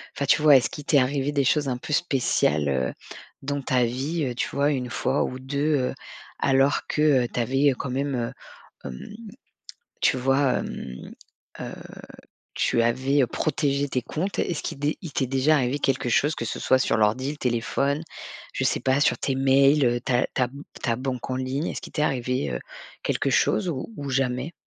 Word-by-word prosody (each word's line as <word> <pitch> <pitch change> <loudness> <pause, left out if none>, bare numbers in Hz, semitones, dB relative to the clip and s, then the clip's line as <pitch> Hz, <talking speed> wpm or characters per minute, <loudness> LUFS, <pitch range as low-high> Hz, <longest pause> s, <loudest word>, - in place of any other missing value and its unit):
enfin 140 - -1
tu 140 - +3
vois? 150 -2 +7
Est-ce 120 -4 +1
qu'il 150 - -9
t'est 145 -2 +4
arrivé 135 +2 0
des 140 -2 +1
choses 145 +2 +2
un 125 - -1
peu 150 +4 -6
spéciales, 120 - +1
heu, 65 -2 0 0.5
dans 145 +1 -2
ta 125 -1 +2
vie? 140 +7 -2
Heu, 125 -2 -3
tu - - -2
vois? 145 +1 +1
1 125 -3 -2
fois - - 0
ou 130 - -4
2 140 +3 0
heu, - - -4 0.5
alors 135 +1 +3
que, 150 - -1 0.2
heu, - - -3
tu - - -1
avais, 135 +4 +3
heu, - - -3
quand 130 0 -5
même, 140 +1 -1
heu, 120 -1 -2 0.6
hem, 65 - -8 1.0
tu - - +3
vois? 135 0 +2
Hem, 65 0 -7 0.5
heu, - - -6 0.8
tu 115 - +2
avais, 130 +4 +2
heu, - - +3
protégé 145 0 0
tes 130 -2 -1
comptes? 185 +10 -3
Est-ce 170 -4 -2
qu'il - - -4
d 145 - +1
est-ce 155 - -2
qu'il 165 -7 -8
t'est 130 - 0
déjà 135 +4 +3
arrivé 130 0 +1
quelque 135 -3 0
chose 145 +6 +2
que - - -4
ce 115 - -4
soit 130 - +3
sur - - +2
l'ordi, 110 +6 +1
le 150 - -5
téléphone, 135 +4 0 0.5
je - - -2
sais - - +1
pas, 130 +1 +2
sur 150 - +3
tes 135 - -1
mails, 135 +2 +4
heu, 120 0 +2
ta 125 0 +1
ta 130 - +2
m 140 +4 -8 0.2
ta 115 -2 +1
banque 130 0 -4
en 130 - -1
ligne, 130 +4 -2
est-ce - - -4
qu'il - - -11
t'est 150 - -1
arrivé, 125 - 0
heu, - - -2 0.5
quelque - - 0
chose 110 +11 +2
ou 155 +8 -4
ou 140 -1 -5
jamais? 130 +3 -1
135 Hz, 205 wpm, -25 LUFS, 125-145 Hz, 1.0 s, vois